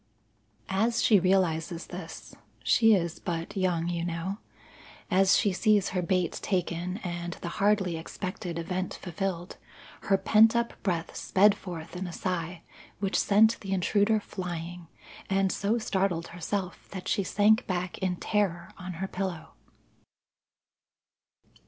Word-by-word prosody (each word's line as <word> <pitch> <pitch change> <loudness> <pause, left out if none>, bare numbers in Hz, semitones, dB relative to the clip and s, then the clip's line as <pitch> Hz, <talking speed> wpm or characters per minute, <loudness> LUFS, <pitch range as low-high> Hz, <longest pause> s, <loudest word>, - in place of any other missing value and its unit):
As 225 +5 +1
she 210 -3 +6
realizes 175 -3 +1
this, 175 -2 -9 0.3
she 225 -2 +5
is 170 -3 -2
but 165 0 -4
young, 180 -3 0
you 170 -1 -2
know, 175 +4 -3 0.7
as 190 +1 +5
she 205 - +2
sees 210 +1 +3
her 185 - -1
bait 180 -1 0
taken 180 -1 -1
and 175 -1 -4
the 170 - -3
hardly 195 -4 +2
expected 175 +1 -5
event 180 +2 -3
fulfilled, 180 0 -4 0.5
her 195 - +4
pent 220 +4 +5
up 235 0 +1
breath 170 -4 -2
sped 200 +2 +4
forth 170 -4 -8
in 185 +1 -4
a - - -6
sigh 175 -2 -3 0.3
which 195 0 -2
sent 220 +3 +4
the 195 -1 -4
intruder 205 +4 +2
flying, 175 -3 -6 0.4
and 195 -1 +2
so 210 +4 0
startled 190 -6 -1
herself 180 +2 -4
that 190 -2 -7
she 200 - +1
sank 210 +3 +3
back 180 -1 -2
in 185 -2 0
terror 175 -3 -1
on 185 0 -6
her 190 +3 -4
pillow. 185 -4 -4
185 Hz, 135 wpm, -28 LUFS, 175-200 Hz, 0.7 s, she